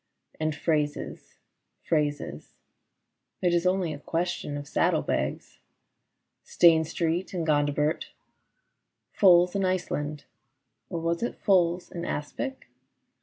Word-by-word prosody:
And 155 -1 -1
phrases, 150 -1 -2 0.5
phrases 145 - -2 0.4
— - - -54
It 175 -1 +3
is 175 +1 +2
only 185 -3 +1
a 145 - -8
question 165 -2 -2
of 145 0 -7
saddle - - +1
bags, - - -3 0.8
Stane 160 -2 +5
Street 170 +4 -2
and 170 -2 -1
Gondibert, 150 +1 +1 1.0
Foals 180 -1 +5
in 195 - +1
Iceland 150 -6 -2 0.7
(or 170 - -3
was 165 +1 -1
it 240 - -2
Foals 175 -3 +2
in 170 -2 -5
aspic 265 - -4
165 Hz, 115 wpm, -27 LUFS, 150-180 Hz, 1.0 s, Stane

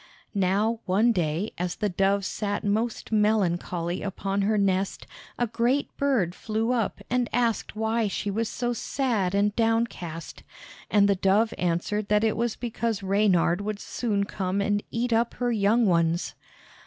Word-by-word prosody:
Now 205 +3 +1
one 210 +6 +4
day, 175 +1 -1
as 180 -1 -2
the 210 - -1
dove 195 +1 +1
sat 205 +1 -2
most 220 +4 -1
melancholy 180 -5 +1
upon 195 0 -2
her 210 +2 +2
nest, 195 -1 0 0.3
a 240 - +1
great 240 +5 0
bird 250 -12 +1
flew 220 +4 -2
up 235 -4 -1
and 250 -1 0
asked 235 -2 0
why 220 +1 0
she 200 +1 -2
was 225 +2 -1
so 240 0 -2
sad 225 -6 -1
and 205 +1 +2
downcast. 225 -8 -1 0.5
And 205 -1 +4
the 200 - +4
dove 195 +4 +2
answered 180 +4 -1
that 210 +1 +3
it 220 - +2
was 235 -1 -1
because 230 -3 -3
Reynard 190 -2 +2
would 210 0 -3
soon 205 -2 -1
come 195 -1 -2
and 205 +1 +1
eat 235 +1 -1
up 230 +1 +1
her 245 -1 0
young 225 +2 +3
ones. 170 -2 +1
210 Hz, 155 wpm, -26 LUFS, 195-230 Hz, 0.5 s, one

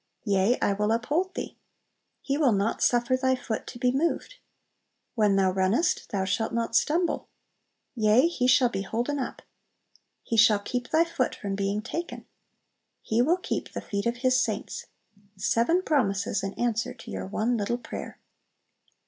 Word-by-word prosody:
"Yea, 200 +3 +2
I 200 - +3
will 210 +2 0
uphold 300 +12 0
thee." - - -5 0.7
"He 275 - -1
will 285 -6 +3
not 200 +2 0
suffer 240 +1 +3
thy 260 0 +2
foot 240 -3 -4
to 245 - -8
be 245 +1 +2
moved." 335 - -1 0.8
"When 210 -4 +3
thou 190 -1 +3
runnest 190 - +1
thou 195 -2 -1
shalt 200 +4 -1
not 230 0 -1
stumble." 335 +7 +1 0.7
"Yea, 220 0 +4
he 260 -7 0
shall 255 -1 +5
be 195 -4 -3
holden 240 +8 -2
up." 260 - -5 0.8
"He 230 - -2
shall 220 -1 +6
keep 245 +5 -4
thy 320 +1 +4
foot 335 -7 -1
from 200 -1 -4
being 200 +2 -1
taken." 335 +9 -5 0.8
"He 225 +2 +1
will 325 +8 +3
keep 365 - -4
the - - -3
feet 200 +1 -3
of 235 +1 -1
His 255 0 +4
saints." - - -3 0.5
Seven 285 - +2
promises 205 - +1
in 195 0 -4
answer 230 -2 -1
to - - -11
your 95 -1 -5
one 225 - 0
little 225 +2 -1
prayer! 245 - -8
235 Hz, 165 wpm, -27 LUFS, 205-260 Hz, 0.8 s, shall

